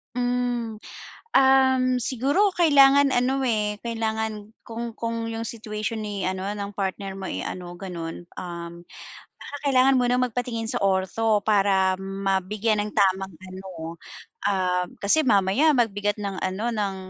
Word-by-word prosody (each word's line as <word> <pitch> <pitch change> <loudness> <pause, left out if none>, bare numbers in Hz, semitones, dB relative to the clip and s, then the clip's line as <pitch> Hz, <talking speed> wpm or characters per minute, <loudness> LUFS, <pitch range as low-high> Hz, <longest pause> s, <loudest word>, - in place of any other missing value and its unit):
Mm, 245 -2 -1 0.6
um, 265 -1 +5
siguro 275 - +1
kailangan 285 -4 +6
ano, 260 +1 +1
eh, 210 -4 0
kailangan 220 -2 -3
kung 230 0 -6
kung 230 0 -3
yung 225 0 -4
situation 215 -1 -4
ni 205 -2 -4
ano, 185 +1 -2
ng 200 -1 -5
partner 195 0 -3
mo, 190 - -6
eh, - - -4
ano 175 -1 -6
gano'n, 175 -2 -7
um, 170 -1 -7 0.5
baka - - -11
kailangan 260 0 +4
mo 245 - +1
nang 250 +1 +2
magpatingin 240 -1 -3
sa 220 - -3
ortho 200 +2 +1
para 195 -3 +2
mabigyan 195 +2 -1
ng 210 0 -5
tamang 190 -1 +2 0.2
ano. 190 +1 -9 0.8
Ah, 180 -2 0 0.2
kasi 205 +10 +4
mamaya 250 +4 +3
magbigat 205 -3 +1
ng 200 -3 -4
ano 190 +3 -2
ng, 205 -3 -2
215 Hz, 135 wpm, -24 LUFS, 195-245 Hz, 0.8 s, kailangan